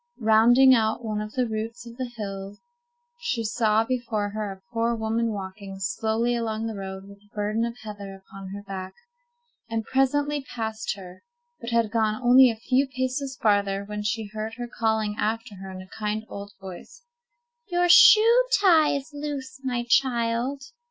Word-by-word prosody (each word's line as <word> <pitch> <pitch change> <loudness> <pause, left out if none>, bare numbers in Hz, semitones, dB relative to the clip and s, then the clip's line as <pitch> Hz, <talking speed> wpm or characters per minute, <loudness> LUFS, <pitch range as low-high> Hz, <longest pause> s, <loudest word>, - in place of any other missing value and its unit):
Rounding 235 +4 +6
one 220 -2 +1
of 215 0 -7
the 250 -2 0
roots 225 +2 -5
of 235 0 -10
the 255 -1 -4
hill 195 -1 -6 0.6
she 250 - -2
saw 220 0 +2
before 225 -4 -2
her 210 -1 -4
a 195 +5 -14
poor 230 +1 +1
woman 225 +1 -1
walking 195 -1 -7
slowly 220 +5 0
along 225 -1 -2
the 225 - -3
road 190 -1 -7
with 200 0 -14
a 205 +1 -28
burden 210 +2 -1
of 235 0 -5
heather 205 -2 -8
upon 195 0 -11
her 200 +2 -7
back, 190 -1 -7 0.7
and 225 -1 -2
presently 285 +3 +1
passed 220 -5 -4
her, 185 -2 -12 0.4
but 235 - -6
had 230 -3 +1
gone 220 -2 +1
only 255 +1 +7
a 230 - -2
few 255 +5 +1
paces 260 0 -3
farther 200 -2 +1
when 210 0 -5
she 215 +2 -2
heard 215 +1 -4
her 240 0 -5
calling 220 -3 -1
after 225 +1 -2
her 190 +1 -8
in 185 0 -8
a 185 - -14
kind 215 +1 -2
old 200 0 -8
voice— 195 - -11 0.6
"Your 355 -2 +1
shoe 450 +7 +7
tie 330 -7 +5
is 280 +2 -5
loose, 290 -1 -6
my 245 -2 -1
child." 245 +1 +1
225 Hz, 170 wpm, -25 LUFS, 205-250 Hz, 0.7 s, only